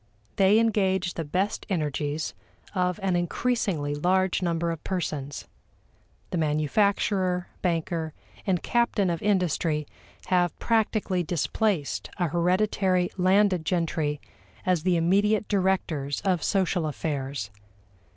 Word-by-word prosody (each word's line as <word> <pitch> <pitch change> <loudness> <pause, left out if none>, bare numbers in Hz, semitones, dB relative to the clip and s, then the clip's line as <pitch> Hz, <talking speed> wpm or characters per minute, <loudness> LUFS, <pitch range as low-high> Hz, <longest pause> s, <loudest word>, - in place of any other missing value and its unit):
They 195 +2 +5
engage 190 -5 +2
the 165 - -3
best 185 +7 -2
energies 150 -3 -2 0.4
of 180 0 0
an 190 -2 +1
increasingly 175 -4 0
large 185 +5 +1
number 170 -1 0
of 165 -2 -6
persons. 150 -6 -3 0.8
The 175 - 0
manufacturer, 180 +4 +1
banker, 165 -2 -1 0.4
and 185 -3 +1
captain 235 -6 +1
of 170 - -3
industry 170 -6 +1 0.4
have 180 -2 +1
practically 215 -5 +1
displaced 175 0 -1
a 175 -3 0
hereditary 185 +1 +1
landed 185 -1 +3
gentry 160 -4 -1 0.5
as 180 -3 +2
the 180 +1 +2
immediate 200 +5 +2
directors 180 -8 0
of 185 -4 +1
social 185 -4 +1
affairs. 140 -7 -3
180 Hz, 110 wpm, -26 LUFS, 160-195 Hz, 0.8 s, They